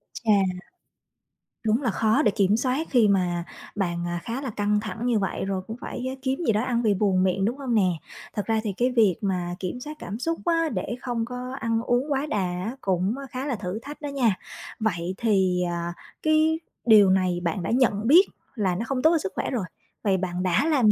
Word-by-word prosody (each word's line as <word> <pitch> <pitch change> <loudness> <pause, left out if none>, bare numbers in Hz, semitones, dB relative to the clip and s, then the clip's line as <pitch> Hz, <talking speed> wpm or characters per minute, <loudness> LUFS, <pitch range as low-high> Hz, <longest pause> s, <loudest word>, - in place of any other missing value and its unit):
Chà! 225 - -1 1.3
Đúng 225 +4 +2
là 240 - +1
khó 220 +2 +2
để 210 - +3
kiểm 200 0 +2
soát 260 +6 0
khi 240 -5 +4
mà 180 -3 +1 0.3
bạn, 175 -4 -1
à, 175 0 -2
khá 235 +4 -4
là 270 - -3
căng 210 -1 +1
thẳng 220 +2 -5
như 240 -3 +2
vậy, 195 -1 -2
rồi 195 -1 -2
cũng 225 +1 -6
phải 250 - -5
á 265 - -4
kiếm 265 +1 -1
gì - - +5
đó 210 - +2
ăn 245 -2 0
vì 215 -3 +3
buồn 190 -2 +2
miệng, 190 +1 +1
đúng 240 +5 -1
hông 260 -4 -1
nè? 190 -4 +4 0.4
Thật 205 - -2
ra 225 -1 +1
thì 210 -3 -2
cái 250 +1 +2
việc 215 -8 +4
mà 180 -3 -1
kiểm 185 +6 -4
soát 300 +4 -7
cảm 200 +5 -6
xúc 330 +5 -1
á, 330 -2 +2
để 200 +4 -2
không 240 -3 -2
có 250 +2 -6
ăn 230 0 0
uống 245 +5 0
quá 275 +1 +1
đà 300 -8 -2
á, 180 +6 -3
cũng 190 +4 0
khá 255 +2 -4
là 280 -4 -1
thử 195 0 -4
thách 290 +2 -9
đó 295 - -3
nha. 245 -8 +2 0.4
Vậy 185 -4 -1
thì, 190 -5 +2
à, 170 0 -3 0.3
cái 310 +1 +3 0.3
điều 210 -4 +7
này 185 -2 +2
bạn 170 +1 -1
đã - - -2
nhận 225 -4 +2
biết 345 +9 +8 0.3
là 195 -6 0
nó 220 +6 -2
không 265 -2 -1
tốt 315 - +5
cho 335 - +4
sức 190 -11 -3
khỏe - - -1
rồi, 230 -8 -1 0.4
vậy 195 -3 +2
bạn 180 -1 -2
đã 185 - +2
làm 265 -9 +4
220 Hz, 225 wpm, -25 LUFS, 190-255 Hz, 1.3 s, biết